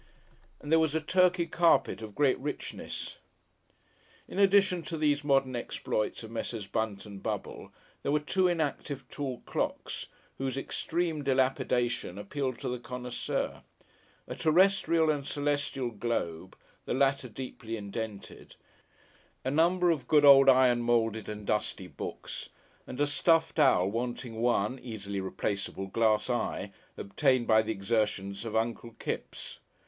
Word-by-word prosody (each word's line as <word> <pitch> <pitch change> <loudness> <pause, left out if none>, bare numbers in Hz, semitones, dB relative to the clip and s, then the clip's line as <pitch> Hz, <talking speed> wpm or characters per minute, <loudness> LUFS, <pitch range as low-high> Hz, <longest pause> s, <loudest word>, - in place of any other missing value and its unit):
And 145 - -7
there 160 - +6
was 160 -1 +1
a - - +3
Turkey 180 +2 +3
carpet 170 -7 +2
of 110 -2 -8
great 140 -3 +3
richness. 145 +2 -5 1.1
In - - -5
addition 195 -2 +4
to 165 0 -5
these 150 -1 +1
modern 135 -3 +2
exploits 115 -2 -2
of 110 - -9
Messrs. 115 -2 -4
Bunt 105 0 -3
and 100 -2 -9
Bubble, - - -5 0.3
there - - -1
were 150 - +3
two 185 +5 +1
inactive 145 -5 -2
tall 135 -4 -4
clocks, - - -3 0.3
whose 135 0 -2
extreme 160 +2 -2
dilapidation 125 -5 0
appealed 130 +5 -3
to - - -3
the 125 0 -2
connoisseur; 125 0 -4 0.7
a - - -4
terrestrial 170 -1 +3
and 145 -2 -2
a - - -10
celestial 145 -3 -1
globe, 95 -6 -3 0.3
the - - -1
latter 135 -1 +2
deeply 115 -1 -6
indented; 105 0 -7 0.9
a 130 - 0
number 175 +4 +3
of 140 -7 -2
good 150 0 +5
old 135 -1 +9
iron 125 -2 +5
moulded 115 -2 +1
and 105 -1 -6
dusty 105 +1 -1
books, - - -7 0.4
and 130 - -7
a 145 - +4
stuffed 165 +2 +2
owl 130 -11 +5
wanting 115 +1 -3
one 120 +1 +1
(easily 100 -5 -5
replaceable) 95 0 -3
glass 110 +2 +2
eye, 120 -5 -2 0.3
obtained 130 +4 +1
by 110 -1 +5
the 110 0 -3
exertions 100 -1 -1
of 110 - -4
Uncle 115 +1 -1
Kipps. - - -5
125 Hz, 140 wpm, -30 LUFS, 110-150 Hz, 1.1 s, old